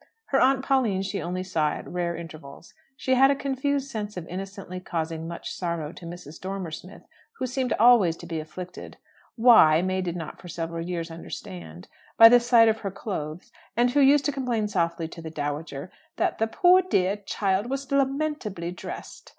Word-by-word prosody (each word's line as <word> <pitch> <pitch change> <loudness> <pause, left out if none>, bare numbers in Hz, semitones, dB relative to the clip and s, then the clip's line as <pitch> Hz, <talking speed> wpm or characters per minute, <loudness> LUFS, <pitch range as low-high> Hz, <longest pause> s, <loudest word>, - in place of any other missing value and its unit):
Her 270 - +3
aunt 265 +1 +3
Pauline 235 -9 +2
she 195 +1 -3
only 180 +2 -3
saw 160 -5 0
at - - -7
rare 175 -1 -2
intervals. 160 -2 -10 0.2
She 260 0 0
had 265 +1 +6
a 280 - +3
confused 275 0 -1
sense 210 -2 -5
of 170 -2 -6
innocently 190 0 -6
causing 165 -2 -4
much 170 0 -6
sorrow 170 -4 -3
to 170 - -10
Mrs. 170 -2 -10
Dormer 190 -3 -4
Smith, 175 +4 -10 0.3
who 260 - -4
seemed 255 0 -2
always 215 -8 +5
to - - -10
be 165 -2 -4
afflicted 175 +4 -9 0.4
(why, 220 -10 +6
May 185 0 0
did 175 -2 -3
not 165 -3 -7
for 180 - -11
several 165 0 -4
years 170 -1 -4
understand) 90 - -9 0.3
by 225 0 +11
the 245 +1 +7
sight 235 -1 +5
of 220 0 +2
her 200 - -3
clothes; 180 -1 -6 0.3
and 245 +1 +3
who 290 - +2
used 280 +1 +5
to 290 - +2
complain 245 -6 -1
softly 170 -4 -1
to 165 +1 -10
the 160 - -6
dowager 145 +1 -5 0.2
that - - -1
"the 225 - +2
poor 360 +10 +5
dear 200 - +1
child 200 +1 -1
was 275 0 -4
lamentably 275 - -1
dressed." 180 - -9
185 Hz, 185 wpm, -26 LUFS, 165-245 Hz, 0.4 s, by